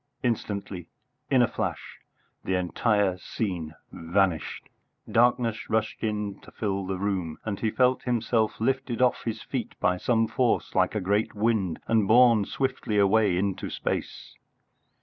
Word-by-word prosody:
Instantly, 100 -7 -3 0.4
in 130 -3 +5
a - - +3
flash, - - -4 0.4
the 95 - 0
entire 95 +1 +1
scene 85 -8 -4 0.2
vanished; 85 0 -1 0.4
darkness 120 -1 +2
rushed 110 +1 -1
in 105 -2 -2
to - - -15
fill 100 -3 -3
the 95 0 -2
room, 95 -5 -2
and 105 -3 -3
he 110 - 0
felt 125 +3 +2
himself 115 -2 0
lifted 130 0 -1
off 125 -1 +2
his 115 -1 -3
feet 125 -5 -5
by 90 -1 +2
some 115 +3 +1
force 115 +2 0
like 95 +2 +2
a 105 - 0
great 100 +4 0
wind 105 -5 0
and 110 -3 +2
borne 115 -2 +6
swiftly 130 -5 -2
away 100 -2 +3
into 95 0 -2
space. - - -4
105 Hz, 145 wpm, -26 LUFS, 95-115 Hz, 0.4 s, borne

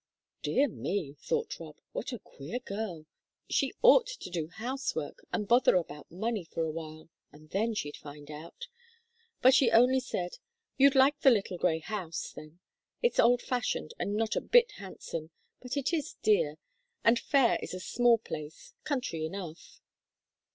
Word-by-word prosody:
"Dear 285 +2 +2
me," 195 - -3
thought 470 -1 -2
Rob, - - -10
"what - - -4
a 245 - -4
queer 160 - -7
girl! 200 -9 -5 0.5
She - - +2
ought - - +7
to - - -7
do 165 -3 -2
housework, 255 - -4
and 210 -2 -1
bother 240 -1 +5
about 150 -4 -2
money 215 +3 -2
for 165 0 -3
a 160 - -1
while, 155 0 -8 0.2
and 155 +1 -17
then 220 +3 0
she'd 145 -7 -4
find 145 0 -11
out!" 165 - -9 0.8
But 260 +1 +8
she 260 -2 +5
only 250 +3 +5
said: 180 -8 -4 0.4
"You'd 275 0 +5
like 270 +2 +5
the 270 - +6
little 195 -6 +1
grey 160 - +2
house, 165 -1 -5
then. 155 +3 -12 0.4
It's 480 - +2
old 245 +1 +5
fashioned, 245 - -2
and 205 - -1
not 220 +1 0
a - - +1
bit 485 0 +5
handsome, 165 -5 -7 0.3
but 255 +2 -4
it 280 +4 0
is 310 -4 -2
dear, 155 -8 +3 0.5
and 230 +1 +5
Fayre 270 -3 +3
is - - -5
a - - -5
small 240 +5 +3
place 155 -8 -8
country 250 - -2
enough." 170 -1 -7
210 Hz, 165 wpm, -30 LUFS, 160-255 Hz, 0.8 s, But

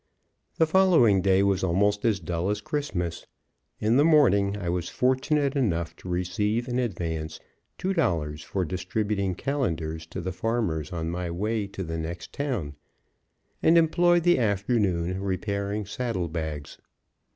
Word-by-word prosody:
The 160 - +5
following 160 - +4
day 95 0 +3
was 95 -1 +1
almost 100 +4 +1
as 110 -4 +2
dull 85 +2 -2
as 105 - 0
Christmas. 145 - -3 0.5
In 110 +4 +2
the 145 - +5
morning 105 - +4
I 95 -4 -5
was 85 0 -1
fortunate 135 +2 +1
enough 85 -11 0
to 90 - -9
receive 105 +6 -1
in 125 0 -1
advance 80 -8 -3 0.4
two 190 +1 -1
dollars 80 - 0
for 95 +4 -2
distributing 95 +2 -2
calendars 80 - -2
to 85 - -6
the 95 +1 -3
farmers 100 -8 -1
on 85 -1 -3
my 90 0 -3
way 105 +4 -1
to 100 -1 -6
the 80 -1 -4
next 85 +2 -6
town, 120 - -2 0.9
and 165 +1 +5
employed 175 +1 +4
the 175 -4 +4
afternoon 100 -5 0
repairing 100 +2 -2
saddle 100 -4 -2
bags. 80 -3 -5
100 Hz, 145 wpm, -26 LUFS, 85-120 Hz, 0.9 s, The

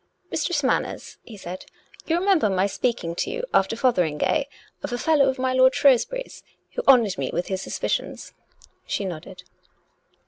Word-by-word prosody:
" - - -42
Mistress 310 -5 -1
Manners," 260 - -2
he 220 - -12
said, 185 -1 -8 0.2
" - - -22
you 330 - +2
remember 360 - +3
my 190 0 +1
speak 235 +4 -1
ing 165 0 -3
to - - -1
you 485 +3 -4
after 195 +3 +2
Fotheringay, 225 - +1 0.4
of - - -5
a 245 - -1
fellow 285 0 +3
of 265 - -2
my 260 0 0
lord 260 0 +5
Shrewsbury's 285 - +2 0.3
who - - -3
honoured 230 - +5
me 135 - -2
with 175 - -3
his 190 -1 -2
suspicions? - - -3 0.3
" - - -28
She 200 - -2
nodded. 180 +1 -7
245 Hz, 180 wpm, -24 LUFS, 190-280 Hz, 0.4 s, lord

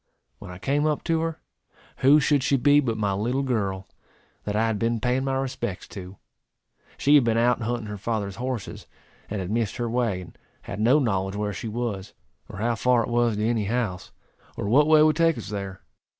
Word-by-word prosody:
When - - -10
I 90 - -8
came 145 +9 0
up 150 -1 -1
to 165 -1 +1
her, 165 -1 -3 0.6
who 140 +3 +6
should 145 -1 +2
she 135 +1 +2
be 145 +3 +5
but 120 -6 -1
my 100 -2 0
little 120 +8 -1
girl, 100 -7 -2 0.6
that 105 - -2
I 110 +2 +2
had 110 -2 -1
been 115 +1 0
paying 125 +3 0
my 135 0 0
respects 125 -7 -3
to. 95 -1 -9 0.8
She 145 - +3
had 145 -3 +7
been 115 -1 +1
out 120 +1 +2
hunting 115 0 -2
her 105 -1 -6
father's 100 -2 -3
horses, 125 -3 -5 0.4
and 105 - -3
had 95 +1 -4
missed 115 -2 -1
her 120 -1 -2
way, 115 -5 0
and 90 - -12 0.3
had 95 - -6
no 120 +7 +4
knowledge 95 -8 0
where 105 0 -2
she 115 - -6
was, 110 -4 -4 0.3
or - - -9
how 115 +3 0
far 120 +2 +2
it - - -5
was 120 -2 +2
to 105 +1 -1
any 115 -3 0
house, 105 -4 -2 0.5
or - - -3
what 145 +8 +4
way 155 -1 +6
would 155 -1 +3
take 165 -1 +3
us - - -7
there. 100 -2 -5
115 Hz, 210 wpm, -25 LUFS, 105-130 Hz, 0.8 s, had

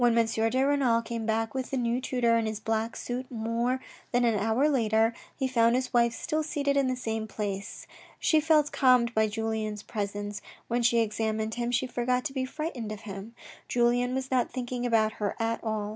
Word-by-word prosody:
de 230 +1 +3
Renal 265 -5 +2
came 230 -1 -4
back 225 0 0
with 260 -1 -3
the 270 - -2
new 240 0 0
tutor 245 -3 +2
in 225 -1 +1
his 215 -1 -3
black 225 +1 -1
suit 250 +1 -4
more 235 +2 -1 0.3
than 245 0 +3
an 230 - +3
hour 220 +7 +2
later, 225 -5 +2 0.2
he 265 - 0
found 235 -2 +3
his 255 0 -1
wife 235 -1 +4
still 310 +6 -2
seated 285 -2 -1
in 275 -2 +3
the 255 - 0
same 225 -3 -3
place. 200 -1 -5 0.3
She 315 - +4
felt 305 -1 +3
calmed 250 -3 +4
by 220 -1 +3
Julien's 215 -1 -3
presence. 205 0 -4 0.3
When 240 +1 0
she 235 0 +4
examined 220 0 -1
him 240 0 -2
she 245 +1 +1
forgot 250 +1 -1
to 280 - -3
be 260 -1 -1
frightened 260 -6 -4
of 215 0 -6
him. 205 +2 -8 0.3
Julien 245 +1 +2
was 265 0 -3
not 255 -2 +2
thinking 245 -1 -3
about 220 -2 +2
her 205 - 0
at 225 0 -1
all. 215 -2 -2
235 Hz, 195 wpm, -28 LUFS, 220-255 Hz, 0.3 s, wife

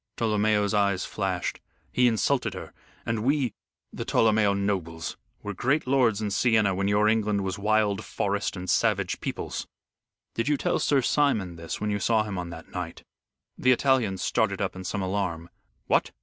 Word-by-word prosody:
Tolomeo's 105 -2 +2
eyes 100 -3 +2
flashed. 95 -4 -2 0.3
"He 125 0 +4
insulted 120 +4 +1
her, - - -8 0.3
and 115 -1 -1
we 135 -3 +1 0.4
the - - -4
Tolomeo 110 -2 +3
nobles 90 -5 -2 0.3
were 105 - -4
great 130 - +1
lords 125 -5 +2
in 105 - -2
Siena 105 -2 +3
when 100 +1 -1
your 105 +1 +3
England 105 -2 +2
was 95 +1 -3
wild 105 -1 +1
forest 100 0 -2
and 90 0 -6
savage 100 -4 +1
peoples." - - -4 0.7
"Did 115 +2 -2
you 150 -1 +2
tell - - 0
Sir 140 -3 +2
Simon 110 - +1
this 85 0 -6
when 105 0 -1
you 100 - -1
saw 110 +1 +2
him 100 -3 -4
on 90 -1 -5
that 80 -1 -10
night?" 90 -2 -6 0.6
The 130 - +4
Italian 125 -7 +2
started - - 0
up - - -2
in 95 - -7
some 100 +1 -2
alarm. 90 -3 -2 0.3
"What? - - +2
105 Hz, 170 wpm, -26 LUFS, 95-115 Hz, 0.7 s, He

